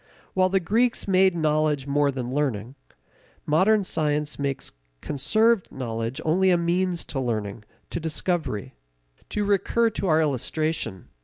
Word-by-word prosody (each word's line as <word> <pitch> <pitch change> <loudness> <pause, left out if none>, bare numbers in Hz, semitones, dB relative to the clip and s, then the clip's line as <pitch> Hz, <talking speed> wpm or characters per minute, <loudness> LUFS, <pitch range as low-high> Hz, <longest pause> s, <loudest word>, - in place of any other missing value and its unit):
While 185 0 +3
the 195 +1 +2
Greeks 230 +7 +1
made 190 -1 +4
knowledge 155 -3 +1
more 145 0 +2
than 130 -2 -4
learning, 130 -5 -1 0.7
modern 195 +7 +3
science 150 -4 -1
makes 140 -1 -3 0.3
conserved 215 - +1
knowledge 115 0 -4
only 185 +4 +3
a 180 - +4
means 175 +1 0
to 135 - -4
learning, 110 -4 -3 0.3
to - - -2
discovery. 160 - -2 0.6
To 210 -1 -1
recur 225 +3 +2
to 195 - -3
our 160 -2 +4
illustration. 150 - -1
155 Hz, 135 wpm, -25 LUFS, 135-185 Hz, 0.7 s, made